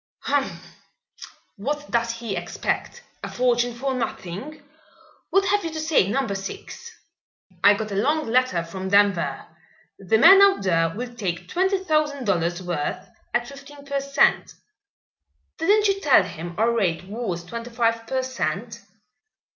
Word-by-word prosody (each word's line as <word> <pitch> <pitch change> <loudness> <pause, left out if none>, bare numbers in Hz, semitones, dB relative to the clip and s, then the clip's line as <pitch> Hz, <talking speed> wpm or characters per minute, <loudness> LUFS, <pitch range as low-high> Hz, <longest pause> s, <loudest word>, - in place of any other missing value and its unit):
"Humph! 280 -1 -3 0.8
What 295 +8 -4
does 235 -1 +1
he 230 -3 -5
expect? - - -3 0.2
A - - -4
fortune 245 -1 +1
for 265 +2 -2
nothing? 250 - -5 0.7
What 390 0 +3
have 410 0 +2
you 330 - -2
to 315 - -4
say, 310 - +2
Number 260 -2 -1
Six?" 195 - -7 0.7
"I 205 - +7
got 215 0 -5
a - - -3
long 295 +10 +1
letter 240 -7 +2
from 190 +3 -6
Denver. 200 -3 +2 0.5
The 195 +3 +2
man 385 - +8
out 395 - +5
there 165 -3 +2
will 245 +2 -5
take 180 -6 -4
twenty 380 - 0
thousand 305 -6 0
dollars' 175 -2 0
worth 170 -5 -3 0.3
at 240 0 0
fifteen 280 +1 -12
per 280 0 -1
cent." 275 0 +2 1.0
"Didn't 415 +5 +3
you 390 0 0
tell 275 - +5
him 175 -1 -7
our 225 +3 +3
rate 185 -8 0
was 195 -4 -4
twenty 230 +6 -7
five 230 -1 0
per 260 +1 -1
cent.?" 255 0 -4
235 Hz, 145 wpm, -23 LUFS, 195-285 Hz, 1.0 s, man